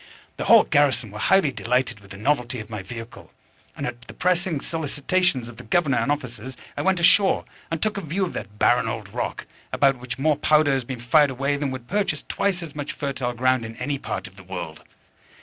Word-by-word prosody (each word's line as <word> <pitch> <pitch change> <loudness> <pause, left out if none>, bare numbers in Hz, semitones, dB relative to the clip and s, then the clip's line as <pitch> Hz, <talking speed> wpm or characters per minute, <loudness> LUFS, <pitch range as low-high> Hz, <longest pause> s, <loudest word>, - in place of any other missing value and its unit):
The - - -3
whole - - +8
garrison 130 -7 +2
were 105 - -8
highly 190 - +4
delighted 125 -2 0
with 100 -1 -17
the 100 - -9
novelty 125 +1 0
of 110 +1 -9
my 105 -2 -4
vehicle; 115 +3 -9 0.5
and - - -3
at 120 0 -5
the - - -12
pressing 180 -3 +1
solicitations 160 -2 0
of 120 - -11
the - - -9
governor 140 +1 +2
and 145 - +1
officers 130 -3 -4 0.2
I - - -2
went 190 -1 +2
ashore, 190 +3 +4 0.2
and 165 -1 -2
took 215 -1 0
a - - -2
view 180 +5 -1
of 175 - -6
that 105 +2 -7
barren 120 +1 +3
old 110 -2 -4
rock, - - -3 0.3
about 135 -2 +3
which 125 0 -6
more 150 +1 +2
powder 150 -1 +4
has 135 -3 0
been 130 -1 -5
fired 140 +5 +5
away 135 +2 0
than 140 -1 -1
would 130 -2 -6
purchase 200 -7 0
twice 190 -3 0
as 155 -3 -9
much 145 0 -4
fertile 135 -3 -3
ground 130 0 +2
in 115 0 -7
any 140 +3 -2
part - - -4
of 95 +1 -17
the 100 - -12
world! 90 -4 -6
135 Hz, 220 wpm, -24 LUFS, 120-155 Hz, 0.5 s, whole